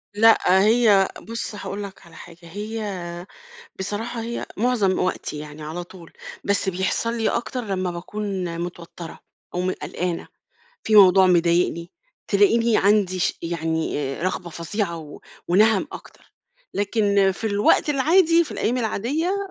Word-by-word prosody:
لأ، 205 Hz, -3 st, +5 dB
هي 215 Hz, -4 st, +5 dB
بُصّ 230 Hz, -1 st, -5 dB
هاقول 205 Hz, 0 st, -5 dB
لك 195 Hz, -3 st, -10 dB
على 170 Hz, -, -16 dB
حاجة، 170 Hz, -1 st, -12 dB
هي 190 Hz, -2 st, -6 dB, 0.5 s
بصراحة 220 Hz, +4 st, -4 dB
هي 235 Hz, +1 st, -4 dB
معظم 215 Hz, -5 st, +1 dB
وقتي 180 Hz, -4 st, -2 dB
يعني 150 Hz, 0 st, -9 dB
على 160 Hz, +4 st, -5 dB
طول، 175 Hz, -1 st, -14 dB, 0.3 s
بس 200 Hz, -1 st, +1 dB
بيحصل 190 Hz, +5 st, -1 dB
لي 225 Hz, -, +1 dB
أكتر 250 Hz, +1 st, -2 dB
لمّا 185 Hz, -2 st, -2 dB
باكون 185 Hz, -1 st, -4 dB
متوترة 170 Hz, -1 st, -8 dB, 0.3 s
أو 180 Hz, -, -1 dB
م 185 Hz, +1 st, 0 dB
قلقانة، 175 Hz, -2 st, -4 dB, 0.6 s
في 220 Hz, -, 0 dB
موضوع 190 Hz, -1 st, +8 dB
مضايقني 170 Hz, 0 st, +2 dB, 0.4 s
تلاقني 235 Hz, -, +3 dB
عندي 195 Hz, -2 st, +2 dB
ش -, -, 0 dB
يعني 160 Hz, -4 st, -2 dB
رغبة 180 Hz, -1 st, -3 dB
فظيعة 170 Hz, +1 st, -3 dB
و 150 Hz, -2 st, -11 dB, 0.3 s
ونَهَم 210 Hz, +3 st, +4 dB
أكتر. -, -, -13 dB, 0.4 s
لكن 200 Hz, -1 st, +2 dB
في 225 Hz, -, -4 dB
الوقت 205 Hz, +7 st, +3 dB
العادي، 330 Hz, +4 st, +4 dB
في -, -, -11 dB
الأيام 245 Hz, +3 st, -1 dB
العادية 275 Hz, -, -1 dB
195 Hz, 135 wpm, -23 LUFS, 175-220 Hz, 0.6 s, موضوع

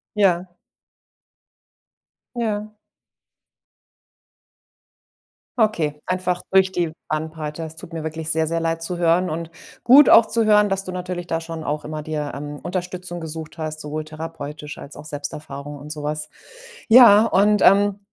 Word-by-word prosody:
Ja. 185 Hz, -3 st, +3 dB, 1.9 s
Ja. 215 Hz, -2 st, -2 dB, 2.9 s
Okay, 160 Hz, -10 st, 0 dB
einfach 180 Hz, -1 st, -1 dB
durch 190 Hz, 0 st, +4 dB
die 170 Hz, -4 st, -1 dB, 0.2 s
Bandbreite. 155 Hz, 0 st, -4 dB
Es 160 Hz, 0 st, -8 dB
tut 165 Hz, -, -11 dB
mir 165 Hz, -1 st, -5 dB
wirklich 160 Hz, 0 st, -4 dB
sehr, 160 Hz, 0 st, +1 dB
sehr 165 Hz, +1 st, -1 dB
leid 165 Hz, 0 st, -1 dB
zu 175 Hz, +1 st, -2 dB
hören 175 Hz, +1 st, +2 dB
und 165 Hz, +1 st, -5 dB, 0.3 s
gut 275 Hz, +4 st, +8 dB
auch 225 Hz, -, +8 dB
zu 230 Hz, -1 st, +1 dB
hören, 210 Hz, -1 st, +4 dB
dass 195 Hz, 0 st, -1 dB
du 185 Hz, -, -5 dB
natürlich 180 Hz, -1 st, -5 dB
da 165 Hz, 0 st, -2 dB
schon 165 Hz, -1 st, -7 dB
auch 150 Hz, +1 st, -2 dB
immer 155 Hz, 0 st, -5 dB
dir, 150 Hz, -1 st, -4 dB
ähm, 145 Hz, +1 st, -7 dB
Unterstützung 180 Hz, -1 st, -4 dB
gesucht 160 Hz, 0 st, -7 dB
hast, 155 Hz, -1 st, -4 dB
sowohl 155 Hz, +1 st, -5 dB
therapeutisch 155 Hz, -1 st, -8 dB
als 140 Hz, -, -10 dB
auch -, -, -10 dB
Selbsterfahrung 145 Hz, -1 st, -7 dB
und 150 Hz, +2 st, -9 dB
so 150 Hz, -1 st, -6 dB
was. 150 Hz, +1 st, -3 dB, 0.6 s
Ja, 225 Hz, -3 st, +8 dB
und, 210 Hz, -1 st, +3 dB
ähm, 200 Hz, +1 st, +4 dB
165 Hz, 145 wpm, -22 LUFS, 155-185 Hz, 2.9 s, gut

